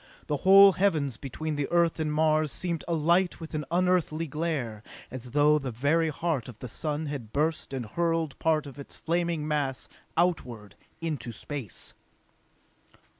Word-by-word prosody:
The 150 - -1
whole 195 +5 +8
Heavens 155 - +1
between 150 +4 -4
the 145 - -1
Earth 170 -1 +2
and 155 -1 0
Mars 155 -1 +2
seemed 170 -3 -2
alight 170 +3 +2
with 160 -1 -9
an 150 -1 -2
unearthly 175 -2 +1
glare, 145 -8 -3 0.3
as 125 -1 -7
though 150 +3 +4
the 135 -3 -4
very 145 +8 +1
heart 155 -5 -2
of 120 - -11
the 125 - -7
sun 150 +6 -3
had 140 -7 -5
burst 155 +3 -1
and 130 -3 -3
hurled 165 +4 -1
part 160 -1 +2
of 140 -1 -10
its 140 - -9
flaming 170 -2 -1
mass 145 -4 -1 0.3
outward 125 - 0 0.3
into 155 -7 -3
space. 130 -2 -5
155 Hz, 155 wpm, -28 LUFS, 135-165 Hz, 0.3 s, whole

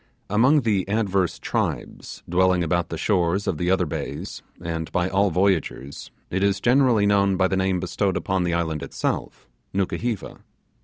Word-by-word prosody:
Among 130 +8 +4
the 100 -5 0
adverse 100 -4 0
tribes - - -4
dwelling 90 0 +3
about 85 +1 0
the 80 - -4
shores 95 +1 +1
of 80 - -2
the 90 - 0
other 95 -1 +2
bays, 75 - -5 0.2
and 80 -1 -4
by 90 0 +1
all 100 +2 +2
voyagers, 85 -7 -1 0.2
it 95 - -1
is 100 0 +2
generally 125 -4 +3
known 100 -1 +3
by 95 0 +3
the 95 - -1
name 95 -1 +1
bestowed 95 0 -1
upon 95 -1 -1
the 85 -1 0
island 80 -3 -1
itself - - -4 0.3
Nukuheva. 105 +3 -2
95 Hz, 160 wpm, -23 LUFS, 85-100 Hz, 0.3 s, Among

